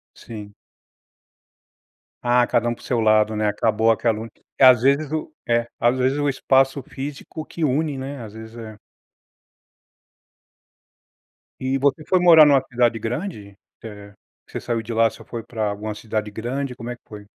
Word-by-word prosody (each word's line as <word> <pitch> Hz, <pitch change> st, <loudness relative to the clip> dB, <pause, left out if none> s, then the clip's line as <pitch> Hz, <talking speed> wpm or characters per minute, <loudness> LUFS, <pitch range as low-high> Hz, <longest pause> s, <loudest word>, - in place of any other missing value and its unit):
Sim. 105 Hz, -3 st, -10 dB, 1.7 s
Ah, 120 Hz, 0 st, +3 dB
cada 120 Hz, 0 st, +1 dB
um -, -, -1 dB
para -, -, -15 dB
o -, -, -16 dB
seu 120 Hz, -, 0 dB
lado 110 Hz, -1 st, +3 dB
né 105 Hz, 0 st, 0 dB
acabou 110 Hz, +2 st, +2 dB
aquela 115 Hz, 0 st, -1 dB, 0.3 s
às 130 Hz, -3 st, +7 dB
vezes 140 Hz, +3 st, +2 dB
o 155 Hz, 0 st, -3 dB, 0.2 s
é, 120 Hz, 0 st, +1 dB
às 120 Hz, +2 st, +2 dB
vezes, 130 Hz, +2 st, +1 dB
o 145 Hz, 0 st, 0 dB
espaço 135 Hz, 0 st, +2 dB
físico 145 Hz, +4 st, -7 dB
que 170 Hz, -, -6 dB
une, 145 Hz, 0 st, 0 dB
né, 135 Hz, +1 st, -6 dB
às 105 Hz, -2 st, -10 dB
vezes 110 Hz, +1 st, -11 dB
é. 110 Hz, -2 st, -9 dB, 2.8 s
E 130 Hz, +1 st, -1 dB
você 140 Hz, +3 st, +1 dB
foi 185 Hz, -, +2 dB
morar 165 Hz, -3 st, +8 dB
em -, -, +5 dB
uma 140 Hz, -2 st, +5 dB
cidade 120 Hz, -2 st, +1 dB
grande? 115 Hz, -, -5 dB, 0.3 s
É 105 Hz, -2 st, -10 dB, 0.3 s
que -, -, -22 dB
você -, -, -4 dB
saiu 115 Hz, -1 st, -2 dB
de 115 Hz, +1 st, -6 dB
lá 115 Hz, 0 st, +4 dB
você -, -, -14 dB
foi 115 Hz, -, -6 dB
para 110 Hz, -2 st, -3 dB
alguma 105 Hz, +1 st, -5 dB
cidade 105 Hz, 0 st, -3 dB
grande, 125 Hz, +5 st, -4 dB
como 120 Hz, -1 st, -8 dB
é -, -, -5 dB
que -, -, -30 dB
foi? 105 Hz, -1 st, -11 dB
120 Hz, 175 wpm, -22 LUFS, 110-135 Hz, 2.8 s, morar